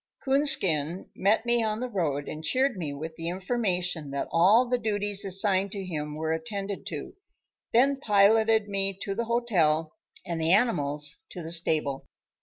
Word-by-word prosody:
Coonskin 190 - +3
met 210 +4 +1
me 240 0 +2
on 215 -1 -1
the 255 - -3
road 155 - -2
and 155 - -7
cheered 260 +6 +1
me 165 -6 -4
with 160 +3 -7
the 165 +1 -4
information 180 - -2
that 140 0 -3
all 205 +9 +4
the 250 0 0
duties 205 -2 -1
assigned 195 0 +1
to 195 -2 -5
him 150 -4 -5
were 160 +1 -2
attended 200 +1 -5
to, - - -6 0.6
then 270 +4 +3
piloted 220 -1 +3
me 195 -1 -1
to 195 - -3
the 230 +3 -3
hotel 170 -10 +1 0.3
and 170 -2 -4
the 160 +2 +2
animals 150 - 0
to 175 - -8
the 165 - -5
stable. 155 -5 0
195 Hz, 165 wpm, -27 LUFS, 160-225 Hz, 0.6 s, all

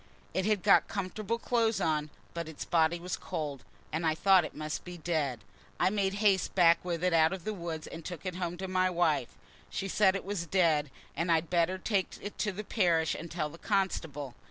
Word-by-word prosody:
It 190 +2 0
had 210 -4 +1
got 200 - +5
comfortable 205 +3 -3
clothes 230 -2 +1
on, 155 -1 0 0.2
but 170 -1 -4
its 155 - -7
body 170 0 +2
was 180 +1 -3
cold, 145 -4 -5 0.3
and 160 +2 -2
I 160 -1 +2
thought 190 +2 +5
it - - -7
must 155 0 -4
be 180 -1 -8
dead. 150 -9 -1 0.4
I - - +3
made 200 -2 0
haste 205 -2 +2
back 170 -2 +5
with 175 -1 -3
it 180 -1 +2
out 160 +1 +5
of 190 -3 -6
the 215 - -2
wood, 170 -4 -5
and 165 0 -8
took 175 +1 -7
it 180 -1 -3
home 175 -1 -3
to 190 +1 -4
my 185 0 +2
wife. 165 -8 0 0.3
She 195 - -3
said 195 0 +3
it 195 - -4
was 190 -4 -3
dead, 160 -5 +2 0.3
and 170 +1 0
I'd 165 0 +1
better 175 +1 +2
take 195 0 -1
it 205 - -8
to 210 - +1
the 200 +3 -6
parish 170 -7 +2
and 170 - -6
tell 155 -3 -2
the 165 +3 -13
constable. 160 - -1
175 Hz, 215 wpm, -31 LUFS, 160-190 Hz, 0.4 s, got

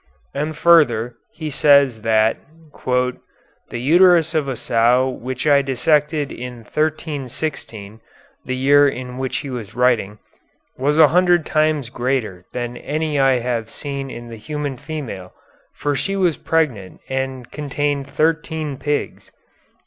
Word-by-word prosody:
And 150 +2 -3
further, 125 -10 +4 0.2
he 155 -1 -5
says 140 -5 +4
that 110 0 +2 0.5
'the 125 -1 -4
uterus 170 +4 +5
of 155 -3 0
a 135 - -2
sow 120 0 +2
which 130 +1 -5
I 145 -2 +5
dissected 150 +2 +1
in 125 -1 -8
1316 140 -7 -4 0.4
(the 130 - -3
year 145 +2 +5
in 125 -1 -7
which 130 -1 -2
he 135 - -5
was 115 -5 -7
writing) 120 -5 +1 0.6
was 145 +3 0
a 155 -2 +7
hundred 175 -1 +3
times 155 -5 +1
greater 120 -9 -2
than 120 0 -4
any 150 +1 -2
I 135 -2 +3
have 115 -2 -2
seen 140 -2 -5
in 120 -1 -8
the 115 - -8
human 145 +3 -4
female, 120 - -7 0.4
for 145 -1 -1
she 195 +7 -2
was 180 -5 +2
pregnant 130 - -1
and 130 -2 -4
contained 145 -1 -2
thirteen 155 -1 -1
pigs.' 145 +1 -3
135 Hz, 135 wpm, -20 LUFS, 125-150 Hz, 0.6 s, a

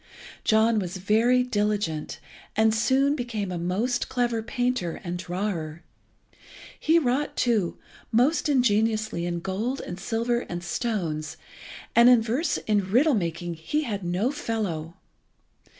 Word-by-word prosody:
John 220 0 +3
was 185 -1 -4
very 225 +6 +3
diligent, 205 -9 -1 0.4
and 220 0 +4
soon 265 +5 +2
became 225 -7 -3
a 175 - -3
most 205 +9 -1
clever 240 -3 0
painter 245 -6 -2
and 175 0 -3
drawer. 175 -3 -4 1.0
He 320 +2 +3
wrought, 275 -1 0
too, 220 -8 +1 0.3
most 270 +8 +2
ingeniously 215 -7 +1
in 170 -1 -3
gold 215 +9 -2
and 175 +1 -7
silver 235 +4 0
and 175 -7 -6
stones, 170 - -3 0.6
and 235 +1 +8
in 250 -2 +7
verse 240 +9 0
and 205 -3 +2
riddle 265 +10 +4
making 175 -4 -2
he 165 - -2
had 205 -7 -4
no 180 +9 0
fellow. 190 - -3
215 Hz, 130 wpm, -26 LUFS, 175-245 Hz, 1.0 s, and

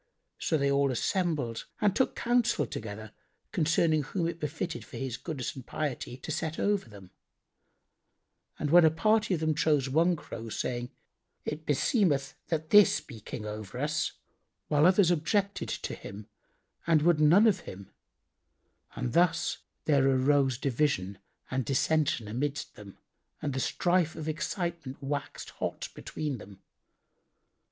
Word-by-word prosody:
So 160 - +1
they 140 -1 +1
all 140 0 +3
assembled 145 - -1
and 205 -2 +2
took 260 - +1
counsel 240 - +2
together 110 -1 -7 0.4
concerning 160 -1 +2
whom 165 +4 -2
it 170 0 -4
befitted 155 +3 -3
for - - -10
his 130 -3 -3
goodness 140 -3 -5
and 130 - -8
piety 130 -3 -4
to 145 - -7
set 160 +1 -2
over 205 - 0
them; 100 -3 -13 1.5
and 150 +1 -1
a 175 -2 +8
party 215 +5 +2
of 160 - -5
them 155 0 +2
chose 150 -3 +2
one 170 +5 +3
Crow, 115 -7 -8
saying, 120 +2 -3 0.6
"It 155 +1 -5
beseemeth 145 - +2
that 160 -1 -2
this 210 -1 +7
be 120 -6 -11
King 105 +1 -7
over 105 +1 -6
us," 155 +3 -1 0.6
whilst 150 +2 +5
others 185 -1 +5
objected 200 +5 0
to - - -4
him 100 +1 -9 0.6
and 160 -3 +4
would 170 -2 +4
none 170 +8 +6
of 205 -4 +4
him; 95 0 -10 1.0
and 125 -2 -3
thus 175 0 +2 0.3
there 140 -3 +4
arose 135 -1 +3
division 125 -8 0 0.3
and 130 0 0
dissension 135 -2 +1
amidst 140 +7 -3
them 100 -2 -12 0.4
and 145 -3 -3
the 135 - -2
strife 175 +3 +1
of 160 -1 -6
excitement 170 -3 -3
waxed 145 +1 -4
hot - - -4
between 145 -5 -4
them. 100 -1 -13
150 Hz, 145 wpm, -29 LUFS, 130-170 Hz, 1.5 s, a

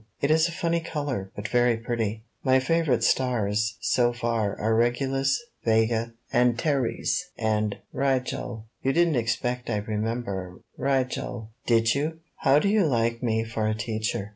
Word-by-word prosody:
It 140 - +1
is 160 +1 +4
a - - -5
funny 170 -1 0
color, 145 - -4
but 105 0 -4
very 120 -1 +3
pretty. 115 -2 -2 0.2
''My 130 0 +4
favorite 150 -2 +1
stars 110 -4 +1
so 120 -1 +3
far 115 -4 -1
are 110 +2 +1
Regulus, 135 - +1 0.2
Vega, 115 +1 +2 0.2
Antares 125 +6 +1
and 110 -2 0 0.2
Rigel. 125 -4 -1 0.2
You 135 - +1
didn't 170 -1 +3
expect 120 +2 -1
I'd 105 -1 -2
remember 105 -4 -3
Rigel, 125 -4 -1 0.2
did 115 -1 +4
you? 155 +3 -1 0.2
"How 135 - +4
do 150 - +2
you 200 -4 +3
like 115 -3 +1
me 110 -2 +1
for 110 -1 -2
a 110 - 0
teacher? 110 -2 -2
120 Hz, 145 wpm, -26 LUFS, 110-135 Hz, 0.2 s, is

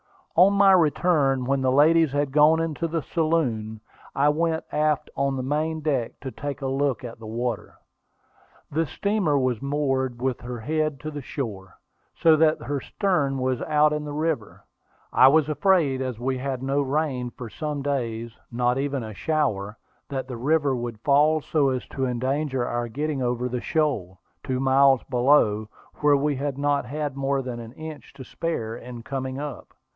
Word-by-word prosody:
On 185 +4 +6
my 200 -1 +6
return, 150 -6 +3
when 135 +1 +1
the 130 -1 +2
ladies 155 +2 +5
had 145 -1 0
gone 150 +3 +5
up 165 - +1
into 165 +1 -3
the 165 -1 -2
saloon, 130 -11 -1 0.3
I 145 +2 +4
went 160 +1 0
aft 150 0 0
on 140 0 0
the 130 - -3
main 155 +4 -1
deck 135 -6 -1
to 130 - -5
take 145 +1 -6
a - - 0
look 135 -2 0
at 120 -2 -8
the 110 - -9
water. 115 0 -3 1.0
The 160 +2 0
steamer 200 -5 0
was 130 -3 0
moored 135 -3 -1
with 130 -1 -2
her 120 -1 -6
head 155 +1 -1
to 155 - -5
the 145 -1 -6
shore, 100 - -6 0.4
so 165 -2 +5
that 155 0 +3
her 140 -1 -2
stern 145 -9 0
was 130 -1 -1
out 150 -1 +3
in 150 0 -2
the 145 -1 -6
river. 150 -7 -2 0.5
I 130 - +7
was 150 +1 +4
afraid, 150 -3 +2
as 130 -3 -3
we 130 +1 -1
had 140 +2 -3
had 130 -1 -3
no 135 +2 +1
rain 135 -3 -1
for 120 -1 -9
some 150 +2 -4
days, 120 -5 -2 0.2
not 125 +2 +1
even 140 -2 -2
a 110 -1 -7
shower, 110 -8 -1 0.3
that 135 -2 -3
the 125 -2 -6
river 145 +2 +1
would 120 -3 -5
fall 150 +3 +4
so 145 -2 +1
as 130 -1 -2
to 135 - -2
endanger 130 +1 -1
our 120 0 -2
getting 145 +3 -3
over 125 0 -1
the 125 -1 -3
shoal, 125 - -1 0.2
two 130 -1 -2
miles 135 0 +4
below, 120 -5 +3 0.3
where 145 -1 +4
we 145 0 0
had 140 0 -3
not 145 -1 +1
had 145 +1 -4
more 135 0 0
than 125 -2 -5
an 115 0 -9
inch 155 0 -9
to 140 -1 -10
spare 115 -5 -3
in 120 -1 -9
coming 130 0 -4
up. 145 -2 -7
140 Hz, 185 wpm, -25 LUFS, 125-150 Hz, 1.0 s, I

